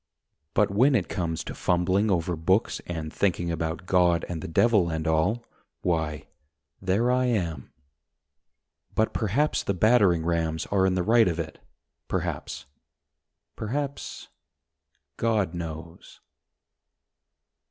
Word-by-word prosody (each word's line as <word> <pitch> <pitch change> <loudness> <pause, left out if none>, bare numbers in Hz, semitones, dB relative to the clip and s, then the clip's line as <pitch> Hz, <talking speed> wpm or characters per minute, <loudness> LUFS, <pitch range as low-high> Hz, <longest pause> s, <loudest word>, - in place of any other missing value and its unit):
But 105 -1 +3
when 130 +7 +4
it 95 -8 +1
comes 85 -4 -2
to - - -6
fumbling 95 +4 +1
over 90 -2 0
books 95 +7 +1
And 80 -3 -5
thinking 85 -3 0
about 80 +2 -3
God 90 -2 +3
and 85 -2 -4
the - - -5
Devil 100 +1 +3
and 80 0 -2
all, 90 +9 +1 0.4
Why, 80 -4 -1 0.6
there 100 +6 +2
I 125 0 +2
am. 85 - -2 1.2
But 110 - +1
perhaps 120 +8 +1
the 100 - -2
battering 95 -5 +4
rams 80 -2 0
are 95 -1 +3
in 95 - +1
the 90 - +1
right 115 +3 +5
of 85 -2 -1
it, 80 -2 -5 0.5
Perhaps, - - -3 0.9
perhaps... 140 +5 -4 0.9
God 110 -6 +1
knows. 85 -1 -8
90 Hz, 120 wpm, -26 LUFS, 80-110 Hz, 1.2 s, right